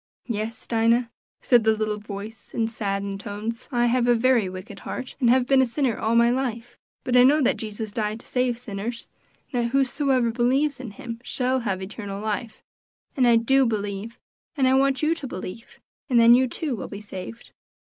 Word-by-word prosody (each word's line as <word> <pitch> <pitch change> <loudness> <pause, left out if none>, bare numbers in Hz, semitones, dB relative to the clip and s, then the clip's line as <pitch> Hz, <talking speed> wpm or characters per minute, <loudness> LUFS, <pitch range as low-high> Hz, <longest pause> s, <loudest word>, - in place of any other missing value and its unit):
"Yes, 225 -1 -4
Dinah," 230 +1 +2 0.3
said 240 -3 +5
the 220 0 +3
little 215 -1 -1
voice 205 +1 -8
in 225 -1 +1
saddened 200 -3 -3
tones, 210 +3 -5
"I 240 -2 +2
have 240 0 +2
a 240 - +5
very 235 -4 +3
wicked 185 +2 -9
heart, 255 - -6
and 245 - +3
have 250 +1 +4
been 270 0 +4
a - - +4
sinner 245 -1 0
all 225 +1 0
my 235 0 +5
life; 240 -2 -3 0.3
but 250 -2 0
I 250 - +8
know 280 +5 +6
that - - +2
Jesus 215 0 -5
died 215 0 -2
to - - -22
save 250 -2 0
sinners, 230 0 -6 0.4
and 245 -1 +1
that 235 - -1
whosoever 265 -2 +2
believes 260 +4 +1
in 260 -3 -6
him 230 +1 -8
shall 260 0 0
have 190 -5 -2
eternal 200 0 -6
life, 215 +1 -4 0.5
and 255 -3 +3
I 235 - +6
do 265 +4 +4
believe, 210 -1 -3 0.4
and 265 -2 +3
I 260 - +4
want 270 +1 +2
you 310 +2 +3
to 300 -5 -7
believe, 185 +1 -8 0.3
and 245 -2 +4
then 230 0 +8
you, 255 +1 +4
too, 275 +2 -3
will 195 - -6
be 200 - -8
saved." 185 - -9
235 Hz, 200 wpm, -24 LUFS, 215-255 Hz, 0.5 s, I